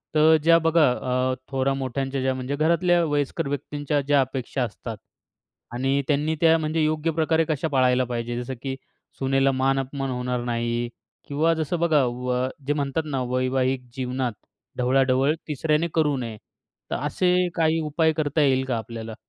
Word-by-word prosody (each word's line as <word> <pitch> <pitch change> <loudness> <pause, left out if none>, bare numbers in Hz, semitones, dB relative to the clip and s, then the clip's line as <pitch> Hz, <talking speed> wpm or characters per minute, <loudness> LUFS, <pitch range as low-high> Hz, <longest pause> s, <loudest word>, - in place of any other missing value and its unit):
तर 155 +1 +6
ज्या 165 0 +6
बघा 165 -3 +4
अ, 130 +1 0 0.2
थोरामोठ्यांच्या 135 0 -1
ज्या 130 0 +1
म्हणजे 130 +2 -3
घरातल्या 170 +3 +3
वयस्कर 145 +1 -1
व्यक्तींच्या 145 +1 -2
ज्या 140 0 +3
अपेक्षा 130 0 -2
असतात 115 0 -6 0.8
आणि 135 +3 +1
त्यांनी 150 +2 +1
त्या 165 -1 +6
म्हणजे 155 0 0
योग्य 155 +1 0
प्रकारे 160 0 +1
कशा 155 +1 0
पाळायला 130 -2 +3
पाहिजे, 120 0 -3
जसं 130 +2 -5
की 135 -1 -3 0.4
सूनेला 135 0 +2
मान-अपमान 135 +1 -1
होणार 125 -1 -2
नाही 120 0 -1 0.4
किंवा 155 +4 +2
जसं 160 +1 -2
बघा 160 -4 +3
व 125 +1 -1 0.2
जे 145 - +2
म्हणतात 145 +2 -1
ना, 135 -4 -2
वैवाहिक 130 0 0
जीवनात 125 -2 -2 0.4
ढवळाढवळ 130 +3 +3
तिसऱ्याने 155 +2 0
करू 150 -3 +2
नये. 115 -3 -5 0.5
तर - - 0
असे 180 +6 +1
काही 160 -1 +2
उपाय 160 +1 +1
करता 155 0 0
येईल 130 -2 +3
का 125 -3 -1
आपल्याला? 115 0 -7
135 Hz, 150 wpm, -24 LUFS, 130-155 Hz, 0.8 s, तर